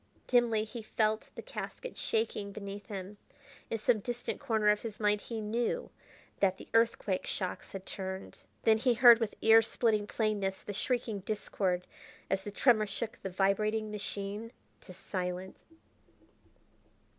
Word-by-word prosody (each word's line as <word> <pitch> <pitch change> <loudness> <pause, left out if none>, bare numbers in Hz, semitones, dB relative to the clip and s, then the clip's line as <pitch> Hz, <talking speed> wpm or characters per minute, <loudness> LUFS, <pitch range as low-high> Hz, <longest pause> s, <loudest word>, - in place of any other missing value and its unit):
Dimly 235 -3 +3
he 225 +2 -7
felt 215 0 0
the - - -7
casket - - -6
shaking 440 - -1
beneath 200 0 -7
him. 200 -1 -6 0.5
In 225 - -1
some 220 +1 +2
distant 240 +3 -3
corner 220 -6 +2
of 210 0 +3
his 220 -3 -6
mind 210 -1 +2
he 230 -2 -5
knew 235 - -1 0.5
that 190 -1 +3
the - - -11
earthquake 225 -4 +2
shocks 185 -2 -3
had 190 -1 -6
turned. 190 -1 -6 0.2
Then 220 -1 +5
he 245 0 +3
heard 235 -1 +9
with 225 -3 -2
ear 225 0 +8
splitting 220 -2 +1
plainness 205 -4 -1
the 205 - -5
shrieking 225 0 -1
discord 190 -3 -1 0.5
as 195 - +2
the 205 - -6
tremor 215 0 +4
shook 220 +2 -4
the 190 - -4
vibrating 210 +3 +1
machine 205 +1 -4 0.3
to - - -13
silence. 185 0 -4
215 Hz, 145 wpm, -32 LUFS, 195-225 Hz, 0.5 s, heard